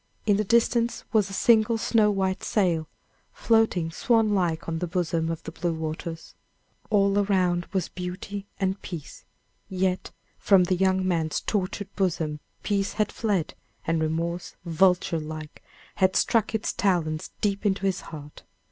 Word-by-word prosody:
In 205 -2 +4
the 215 - +1
distance 235 +2 +2
was 210 -3 +3
a - - -8
single 225 +1 +4
snow 220 -1 +3
white 190 -2 -1
sail, 170 -7 +1 0.5
floating 220 -8 +2
swan 225 +4 +2
like 170 -4 0
on 165 -1 -2
the 180 - -2
bosom 165 -2 -1
of 165 -1 -4
the - - -6
blue 170 0 -2
waters. 160 +1 -5 0.6
All 200 -1 +3
around 185 -4 +1
was 190 -3 0
beauty 185 +3 -6
and 190 0 -1
peace, 170 -6 -8 0.4
yet 185 0 -1 0.3
from 195 -3 +5
the 185 +1 +1
young 190 0 +2
man's 165 -3 0
tortured 200 0 -3
bosom 165 -6 -1 0.2
peace 200 -1 0
had 215 -1 0
fled, 200 -8 -1 0.3
and 165 0 +1
remorse, 170 +2 -2
vulture 175 0 +2
like, 155 0 -8 0.4
had 190 -1 +3
struck 225 -1 +2
its 220 - -1
talons 165 -5 0
deep 200 0 0
into 195 -2 0
his 190 -2 0
heart. 150 -2 -10
185 Hz, 150 wpm, -26 LUFS, 165-205 Hz, 0.6 s, from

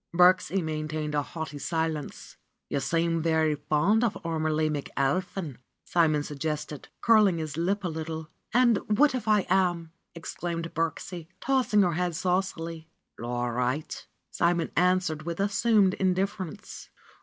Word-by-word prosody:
Birksie 180 +1 +4
maintained 155 -1 -3
a 145 - +2
haughty 150 -1 -6
silence. 160 -1 -3 0.4
^'You 140 - 0
seem 165 +3 +1
very 160 -1 +2
fond 165 - +2
of 230 - +1
Ormelie 155 -1 0
McAlpin," 145 +2 -2 0.3
Simon 155 -4 +2
suggested, 150 0 -4
curling 215 -6 +5
his 155 -3 -4
lip 195 +5 0
a - - 0
little. 160 -1 -5 0.2
^^And 240 -3 +4 0.2
what 295 +1 +5
if 245 -4 -4
I 210 -2 +3
am?" 175 -3 +1 0.2
exclaimed 170 0 -5
Birksie, 165 +1 -3
tossing 250 -6 +3
her 175 -2 +1
head 175 0 -1
saucily. 170 -3 -2 0.3
^^All 120 0 -2
right," 125 +5 -2 0.2
Simon 170 -1 +1
answered 180 -3 +2
with 170 +2 -5
assumed 205 -1 +3
indiffer 190 0 0
ence. - - -11
165 Hz, 130 wpm, -27 LUFS, 155-185 Hz, 0.4 s, curling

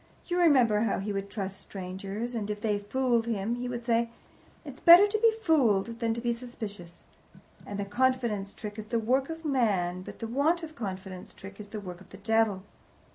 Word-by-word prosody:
You 355 0 -1
remember 255 -11 +5
how 220 -2 +1
he 205 +1 -3
would 195 0 -3
trust 195 -2 -5
strangers, 195 +5 -5
and 215 -3 -3
if 210 0 -3
they 210 -1 0
fooled 235 +2 0
him 220 0 -1
he 250 0 -4
would 240 -1 -5
say, 235 -1 +2 0.6
'It's - - -9
better 345 +3 +9
to 420 +1 -1
be 455 0 +5
fooled 230 - +2
than 225 -1 0
to - - -3
be 240 0 +1
suspicious' 215 -8 -8 0.6
that 200 - -5
the 200 - -2
confidence 230 -3 0
trick 210 0 -7
is 215 - -7
the 230 - 0
work 255 +5 +1
of 325 0 -7
man, 200 -10 +1
but - - -9
the 230 - -5
want 290 +9 +1
of 315 -1 -7
confidence 190 -5 -7
trick 195 +1 -11
is 210 - -8
the 215 +1 -6
work 180 -3 -8
of - - -16
the 195 - -11
devil." 215 -2 +1
225 Hz, 205 wpm, -29 LUFS, 200-250 Hz, 0.6 s, better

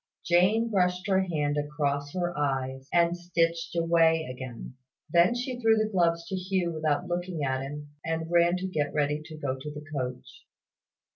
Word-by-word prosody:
Jane 200 +7 +3
brushed 180 -2 +1
her 190 -2 +3
hand 150 -5 0
across 145 -1 -2
her 175 -1 -2
eyes, 135 -2 -2
and 170 0 +3
stitched 170 -1 -1
away 165 -1 +3
again. 125 -1 -7 0.4
Then 175 +7 +5
she 245 0 -3
threw 225 -2 +4
the 215 0 +1
gloves 170 -3 +2
to 190 - -2
Hugh 185 -1 -1
without 155 +1 0
looking 175 -2 -3
at 130 -1 0
him, 145 +2 -7
and 165 0 -3
ran 175 +1 +4
to 185 +1 -3
get 150 -6 -2
ready 150 0 +1
to 155 0 -10
go 140 -4 -2
to 135 +3 -7
the 150 0 -9
coach. 130 - -5
165 Hz, 170 wpm, -28 LUFS, 145-180 Hz, 0.4 s, Then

